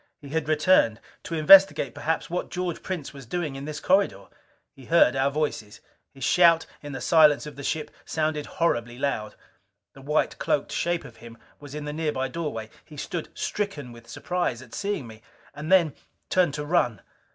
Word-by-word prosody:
He 140 - -11
had 160 0 -2
returned, 155 -8 +3 0.2
to 165 - -5
investigate 165 -5 +6
perhaps 160 +1 -2
what 175 +1 -3
George 180 -2 -3
Prince 175 -7 -5
was 135 -4 -11
doing 155 -1 -3
in 135 +1 -6
this 150 0 -5
corridor. 185 - +1 0.5
He 135 - -14
heard 165 -6 +4
our 135 +1 +2
voices. 140 -8 -3 0.3
His 135 - -10
shout 170 +1 +5 0.2
in 145 - -8
the 135 - -5
silence 150 +2 +5
of 150 -2 -9
the 140 - -8
ship 155 +2 -2
sounded 155 -2 -2
horribly 120 -8 0
loud. 110 -6 -2 0.6
The 135 - -14
white 150 +3 0
cloaked 145 - 0
shape 175 0 -1
of - - -13
him 115 0 -12 0.2
was 145 -1 -10
in 150 -1 -5
the 150 - -4
nearby 150 -4 -2
doorway. 125 -8 -5
He 150 - -14
stood 165 +3 -4
stricken 175 -12 -3
with 115 0 -14
surprise 175 -9 -2
at 120 - -17
seeing 205 -9 -3
me. 110 -1 -12 0.3
And 150 +4 -6
then 170 -6 +5 0.4
turned 175 -6 +2
to 150 0 -4
run. 120 - +1
150 Hz, 185 wpm, -25 LUFS, 135-170 Hz, 0.6 s, investigate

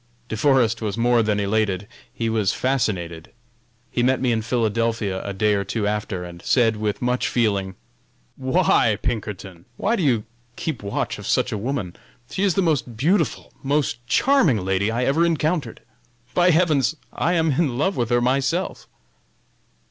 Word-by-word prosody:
De - - -2
Forest 120 -2 +2
was 105 -2 -3
more 120 0 +3
than 105 -2 0
elated, 100 -1 0 0.2
he 115 - -3
was 110 -2 +1
fascinated. 90 -11 -2 0.6
He 120 - 0
met 130 +2 +2
me 125 -2 +1
in 115 -1 +1
Philadelphia 115 -3 -1
a 100 - -4
day 105 +2 +1
or 100 -1 0
two 105 +2 -2
after 105 -3 -2
and 85 -1 -9
said 115 -4 +2
with 105 0 -2
much 125 +1 +1
feeling: 100 -5 0 0.6
"Why, 130 - +2
Pinkerton, 100 -7 -4
why 220 +4 +1
do 195 - -2
you 125 -9 +2 0.3
keep 155 -6 -4
watch 100 0 -3
of - - -7
such - - +1
a - - -1
woman? 115 -6 -3 0.4
She 190 - -3
is 195 -4 +2
the 195 - +2
most 140 -8 -1
beautiful, 160 - 0
most 140 -4 0
charming 165 - +3
lady 95 +2 +1
I 120 +2 0
ever 140 +6 +2
encountered! 160 -5 0 0.5
By 175 0 +4
heavens! 155 -5 +3 0.2
I 175 - 0
am 160 -2 +2
in 135 -3 0
love 190 +7 +1
with 120 -2 -1
her 120 0 +3
myself!" 135 +8 0
120 Hz, 165 wpm, -22 LUFS, 105-140 Hz, 0.6 s, By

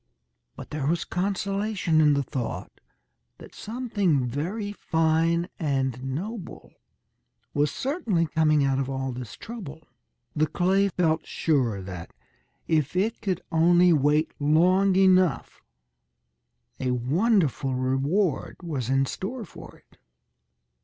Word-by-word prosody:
But - - -10
there 150 -2 -2
was 170 +2 0
consolation 195 -2 0
in 150 -2 +5
the 140 - +1
thought 125 -2 -5 0.7
that - - -13
something 205 - -1
very 180 - -3
fine 165 -1 +1
and 135 -5 -1
noble 175 - -6 0.8
was 145 +1 +2
certainly 240 - -1
coming 155 -2 +2
out 135 -1 +1
of 135 -1 -2
all 135 -1 -2
this 125 -3 -7
trouble. 170 -10 -9 0.5
The 155 +1 +2
clay 185 +5 +2
felt 165 -3 0
sure 125 - 0
that, 90 -2 -8 0.5
if 155 -1 +1
it 215 +5 0
could 185 -3 -2
only 175 +2 +5
wait 150 +1 +2
long 180 +6 +3
enough, 185 -6 +3 1.2
a 130 - -1
wonderful 135 - +1
reward 135 +7 0
was 140 -8 -3
in 135 +1 +3
store 220 - -5
for - - -13
it. - - -28
160 Hz, 120 wpm, -26 LUFS, 135-190 Hz, 1.2 s, in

